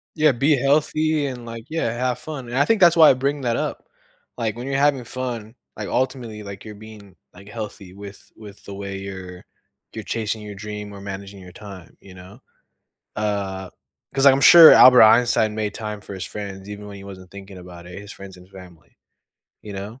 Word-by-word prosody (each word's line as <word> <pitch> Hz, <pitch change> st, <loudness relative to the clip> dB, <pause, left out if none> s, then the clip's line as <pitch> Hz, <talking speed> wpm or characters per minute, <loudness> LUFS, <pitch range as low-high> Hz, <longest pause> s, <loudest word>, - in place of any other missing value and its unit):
Yeah, 155 Hz, -2 st, +4 dB
be 140 Hz, +5 st, +2 dB
healthy 150 Hz, +3 st, +1 dB
and, 125 Hz, -3 st, -6 dB
like 115 Hz, -1 st, -9 dB
yeah, 160 Hz, -6 st, -1 dB
have 125 Hz, +1 st, -2 dB
fun, 150 Hz, -5 st, -7 dB
and 120 Hz, +2 st, -4 dB
I 145 Hz, -, +3 dB
think 225 Hz, +3 st, +2 dB
that's 170 Hz, -2 st, +6 dB
why 160 Hz, -2 st, +8 dB
I -, -, +6 dB
bring 140 Hz, +2 st, -2 dB
that 120 Hz, -3 st, -1 dB
up, -, -, -4 dB, 0.5 s
like, 115 Hz, -3 st, -2 dB
when 125 Hz, +3 st, -7 dB
you're 135 Hz, -, -1 dB
having 140 Hz, -2 st, +2 dB
fun, 120 Hz, -3 st, -6 dB, 0.2 s
like, -, -, -6 dB
ultimately, 120 Hz, -5 st, -3 dB
like, 100 Hz, -1 st, -9 dB
you're 105 Hz, -1 st, -9 dB
being, 105 Hz, -3 st, -14 dB, 0.2 s
like, 100 Hz, +2 st, -15 dB
healthy 105 Hz, -4 st, -8 dB
with 100 Hz, 0 st, -12 dB
with 105 Hz, -2 st, -14 dB
the 100 Hz, -, -8 dB
way 100 Hz, 0 st, -6 dB
you're 95 Hz, -2 st, -9 dB, 0.5 s
you're -, -, -7 dB
chasing 110 Hz, -1 st, -3 dB
your 105 Hz, -1 st, -8 dB
dream 105 Hz, 0 st, -8 dB
or 100 Hz, -, -11 dB
managing 100 Hz, 0 st, -8 dB
your 90 Hz, -1 st, -13 dB
time, 95 Hz, -4 st, -12 dB
you 95 Hz, -, -15 dB
know, 95 Hz, +5 st, -14 dB, 0.8 s
uh, 100 Hz, -3 st, -3 dB, 0.4 s
'cause 135 Hz, 0 st, +2 dB
I'm 135 Hz, 0 st, +6 dB
sure 165 Hz, +3 st, +10 dB
Albert 125 Hz, -1 st, +8 dB
Einstein 110 Hz, -1 st, +4 dB
made 105 Hz, -1 st, -2 dB
time 105 Hz, -1 st, -6 dB
for 100 Hz, -, -10 dB
his 95 Hz, -, -6 dB
friends 100 Hz, -1 st, -8 dB
even 105 Hz, 0 st, -8 dB
when 100 Hz, -1 st, -10 dB
he 100 Hz, -, -12 dB
wasn't 95 Hz, -2 st, -12 dB
thinking 100 Hz, -1 st, -11 dB
about 90 Hz, -1 st, -12 dB
it, 90 Hz, +1 st, -9 dB
his 100 Hz, 0 st, -11 dB
friends 95 Hz, -1 st, -12 dB
and 90 Hz, 0 st, -17 dB
family, 90 Hz, -4 st, -16 dB, 0.7 s
you 105 Hz, -, -9 dB
know, 100 Hz, +5 st, -8 dB
105 Hz, 205 wpm, -21 LUFS, 100-125 Hz, 0.8 s, sure